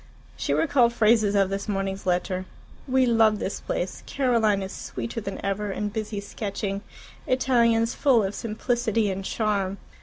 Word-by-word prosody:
She - - -2
recalled 255 -6 +3
phrases 215 -2 +3
of 195 -1 +3
this 200 +2 -3
morning's 195 -1 -2
letter: 185 +1 0 0.4
"We 260 0 +3
love 225 -3 +4
this 200 - -3
place 180 +1 -3
Caroline 230 -7 +2
is 190 - -6
sweeter 120 - -5
than 195 -2 -5
ever, 200 +1 -1
and 205 +1 -3
busy 215 -2 -3
sketching 200 -1 -4 0.5
Italians 235 -3 +3
full 255 -7 +3
of 195 +1 -2
simplicity 225 -1 0
and 195 +1 -4
charm." 200 -2 -1
210 Hz, 150 wpm, -25 LUFS, 195-230 Hz, 0.5 s, love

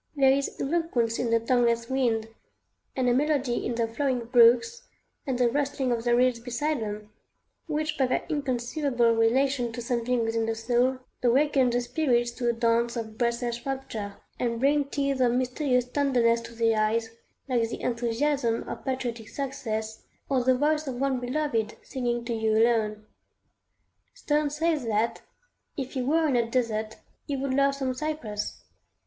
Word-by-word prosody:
There 270 -2 +5
is 275 +1 -1
eloquence 270 -7 0
in 240 - 0
the 230 0 +3
tongueless 235 -1 +1
wind, 235 -4 0 0.7
and 255 -2 +1
a 245 - +4
melody 275 -2 +1
in 240 - -2
the 230 -1 0
flowing 250 0 -1
brooks 240 - +4 0.4
and 260 -2 0
the 245 -1 +3
rustling 275 0 -1
of 235 -1 -1
the 240 0 +4
reeds 250 -1 +3
beside 275 +5 -2
them, 210 -1 -6 0.6
which 305 -1 -2
by 265 - +3
their 255 - -1
inconceivable 260 -4 0
relation 245 +2 +2
to 240 - -6
something 240 0 0
within 225 0 0
the 225 - -1
soul, 245 +3 +1 0.2
awaken 260 +1 +3
the 245 0 +1
spirits 240 -3 +1
to 240 0 -1
a - - +2
dance 235 +1 +1
of 220 -2 -5
breathless 235 0 -1
rapture, 260 -7 -4 0.2
and 235 -2 -1
bring 285 +2 +3
tears 275 -1 -1
of 240 -2 +3
mysterious 250 0 +1
tenderness 250 -3 +2
to 230 0 -11
the 225 -1 +2
eyes, 225 +1 0 0.4
like 235 -4 +1
the - - -6
enthusiasm 235 +1 0
of - - -6
patriotic 245 -4 -3
success, 220 -5 -4 0.3
or 260 -3 +1
the 255 0 +3
voice 300 +2 +1
of 260 - -3
one 270 -1 +1
beloved 245 -4 -1
singing 240 -2 -2
to 235 - -2
you 220 -1 +1
alone. 220 -2 +2 1.1
Sterne 300 -10 0
says 305 -1 0
that, 220 +1 0 0.6
if 265 -2 -4
he 260 - -1
were 315 +5 +2
in 275 - +1
a 235 -1 +1
desert, 220 -3 -1 0.3
he 280 - -2
would 270 0 -2
love 275 +1 +3
some 265 -2 -2
cypress. 255 -8 -4
245 Hz, 165 wpm, -27 LUFS, 230-275 Hz, 1.1 s, There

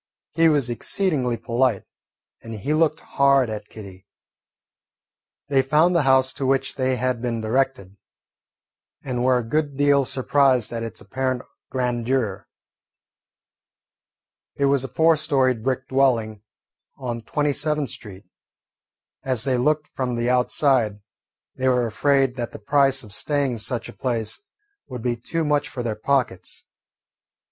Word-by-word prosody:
He 165 +1 +4
was 145 -5 +2
exceedingly 130 - 0
polite, 120 -2 0 0.6
and 115 0 -8
he 110 +9 -2
looked 160 0 +2
hard 140 -4 +2
at 105 -1 -6
Kitty. 95 -3 -12 1.4
They 135 -2 +3
found 155 +7 +3
the 170 - +4
house 130 -1 +3
to 135 - -4
which 135 0 +1
they 130 -1 0
had 125 -2 -1
been 120 -2 -2
directed, 110 -4 -1 1.1
and 125 -2 -2
were 130 0 +4
a 125 - -1
good 145 +1 -1
deal 140 -1 +4
surprised 130 -2 +2
at 115 - -3
its 115 -1 -6
apparent 130 +4 -2 0.3
grandeur. 125 -4 -1 2.1
It 140 - +1
was 140 -1 +2
a - - -3
four 160 +5 +3
storied 130 -6 +1
brick 130 0 -1
dwelling 115 -6 +1 0.6
on 120 -3 -4
Twenty 145 +5 -1
seventh 150 -1 -1
Street. 100 -2 -10 1.0
As 130 -4 -1
they 130 -1 +1
looked 150 +4 +1
from 125 -2 -3
the 120 +1 0
outside, 125 -4 +2 0.6
they 130 - 0
were 125 -1 +2
afraid 135 +2 +1
that 120 -1 -4
the - - -7
price 135 +4 +2
of 105 -3 -9
staying 145 +3 0
in 120 - -5
such 115 +2 -3
a - - -10
place 115 - -3 0.5
would 125 -3 -7
be 120 -1 0
too 160 +7 -3
much 150 0 +1
for 125 - -5
their 115 -2 -1
pockets. 120 -4 -2
130 Hz, 145 wpm, -23 LUFS, 115-140 Hz, 2.1 s, He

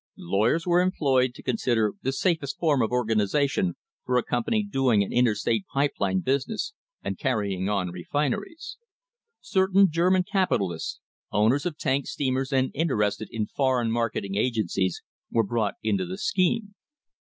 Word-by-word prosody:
Lawyers 110 - +1
were 175 0 +4
employed 135 -8 +1
to - - -12
con - - -1
sider 115 - +1
the 135 - 0
safest 145 -2 -1
form 150 -6 +2
of 115 - +1
organisation 115 - +1 0.3
for 125 - +1
a 125 - +2
company 210 - 0
doing 135 - +2
an - - -6
interstate 115 -3 +2
pipe 140 +1 +1
line 95 -1 +1
business 140 - -1 0.3
and - - -4
carrying 100 - -1
on 95 -4 -1
refineries. 145 - -3 0.6
Certain 190 - +3
German 180 +3 +3
capitalists, 105 - -1 0.3
owners 115 - +2
of 160 -4 -5
tank 135 +1 0
steamers 135 0 -1
and 130 -1 +1
in 165 +4 0
terested 105 -4 0
in 110 -2 -2
foreign 125 -2 0
marketing 115 -4 -1
agencies, 105 -5 0 0.3
were 115 - +2
brought 115 - -1
into 190 -3 0
the 185 +1 -5
scheme. 200 +2 0
130 Hz, 150 wpm, -26 LUFS, 110-165 Hz, 0.6 s, were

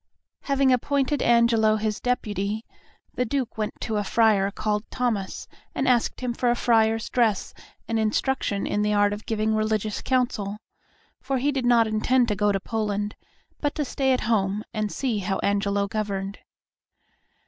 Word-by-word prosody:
Having 275 -2 +3
appointed 280 +2 0
Angelo 230 -2 +4
his 215 -1 -2
deputy, 215 -3 -2 0.5
the 250 - 0
Duke 255 0 -2
went 215 -1 -4
to 220 - -2
a 205 - 0
friar 205 -2 +3
called 210 +1 -2
Thomas 225 -7 -2 0.3
and 270 - 0
asked 245 -1 +2
him 250 -1 -1
for 245 +1 0
a 240 - +3
friar's 225 -2 +2
dress 225 -5 +1 0.3
and 225 -1 0
instruction 220 -1 0
in 205 - 0
the 210 0 +1
art 205 0 +3
of 210 +1 -8
giving 220 0 0
religious 215 -1 -1
counsel, 235 -6 0 0.6
for 270 - -1
he 280 +3 +1
did 265 -3 -1
not 235 -2 +5
intend 235 +3 +2
to 210 - +1
go 205 +1 +2
to 195 - 0
Poland, 210 -1 -2 0.4
but 290 -1 -1
to 300 - -1
stay 265 0 0
at 255 - +2
home 210 -2 0
and 215 -2 -2
see 245 -6 -1
how 195 0 -1
Angelo 200 0 +1
governed. 200 -2 -3
220 Hz, 165 wpm, -25 LUFS, 205-245 Hz, 0.6 s, not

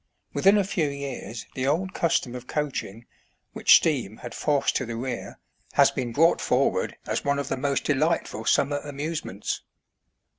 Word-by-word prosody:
Within 195 +2 +5
a 205 - +3
few 190 -5 0
years 135 -5 -6
the 130 0 -2
old 180 +6 0
custom 150 -7 0
of 125 0 -8
coaching, 130 -7 -3 0.5
which - - +6
steam 125 -10 +1
had 120 -2 -8
forced 145 -2 +1
to 130 - -2
the 115 - -4
rear, 125 +2 -5 0.4
has - - +5
been 125 -2 -3
brought 165 +8 +4
forward - - +1
as - - -2
one 140 0 +1
of 140 -1 -3
the - - 0
most 140 +1 -1
delightful 150 -6 0
summer 145 +1 +2
amuse 150 +3 -4
ments. 100 +2 -4
140 Hz, 170 wpm, -26 LUFS, 125-155 Hz, 0.5 s, which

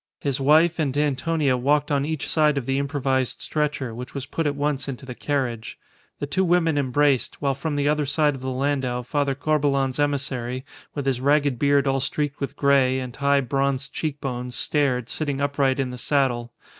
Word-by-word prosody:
His 140 -2 -1
wife 160 +5 +4
and 145 -3 0
Antonia 145 0 +1
walked 145 +4 +1
on 140 -1 +1
each 160 -2 -3
side 150 -2 +2
of 135 - -2
the 135 +1 0
improvised 135 -2 -1
stretcher, 145 -5 -2
which 125 +4 -8
was 135 -2 -4
put 160 +3 -2
at 145 - -1
once 145 -1 -1
into 135 0 -6
the 130 - -6
carriage. 125 -5 -3 0.4
The - - -3
two 185 +7 0
women 170 -3 +2
embraced; 140 -1 +1
while 140 -1 +1
from 145 +3 -3
the 145 0 +1
other 150 -1 +1
side 150 +1 +2
of 135 - -8
the 130 - -3
landau 130 -2 -1
Father 140 +2 0
Corbelan's 140 -2 +1
emissary, 130 -3 -1 0.3
with 145 -2 -3
his 130 -2 0
ragged 140 -2 +2
beard 140 -1 +3
all 135 0 +1
streaked 145 +1 -2
with 140 - -4
grey, 135 -2 +3
and 125 -2 -6
high, 140 0 +2
bronzed 135 +1 -1
cheek 150 -3 -3
bones, 125 -2 -4
stared, 130 -5 0
sitting 145 -1 -2
upright 140 -1 +1
in 130 -2 -1
the 125 - -8
saddle. 125 -5 0
140 Hz, 195 wpm, -24 LUFS, 130-145 Hz, 0.4 s, wife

